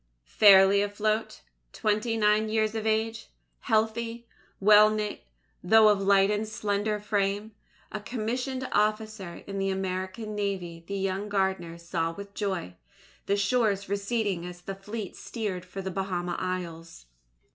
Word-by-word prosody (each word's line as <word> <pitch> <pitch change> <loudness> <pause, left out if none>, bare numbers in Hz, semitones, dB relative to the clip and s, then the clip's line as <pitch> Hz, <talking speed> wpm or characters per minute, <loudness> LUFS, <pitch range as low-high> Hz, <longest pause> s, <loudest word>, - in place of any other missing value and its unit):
Fairly 195 - +6
afloat 215 +2 -1 0.3
twenty 215 +1 0
nine 215 0 +3
years 215 0 +1
of 220 -1 -2
age 220 +1 -1 0.3
healthy, 230 +1 -1 0.3
well 210 +1 +7
knit, 215 -1 -3 0.4
though 220 +3 +6
of 205 -2 +2
light 195 0 +4
and 210 +1 -1
slender 210 0 -1
frame 205 +1 -1 0.4
a 215 - -4
commissioned 250 +4 -3
officer 215 -4 -1
in 195 -1 -5
the 195 0 0
American 190 +3 -3
Navy 190 -5 -3
the 200 - -3
young 195 +2 -2
gardener 190 -4 -1
saw 170 -1 -2
with 200 +3 -10
joy, 190 - -3 0.5
the 200 - +2
shores 200 -2 +1
receding 200 -2 -1
as 180 0 -8
the 195 +2 -5
fleet 200 +1 -7
steered 205 -6 -4
for 190 +1 -7
the 190 - -3
Bahama 180 -2 -2
Isles. 170 - -5
205 Hz, 135 wpm, -28 LUFS, 190-215 Hz, 0.5 s, well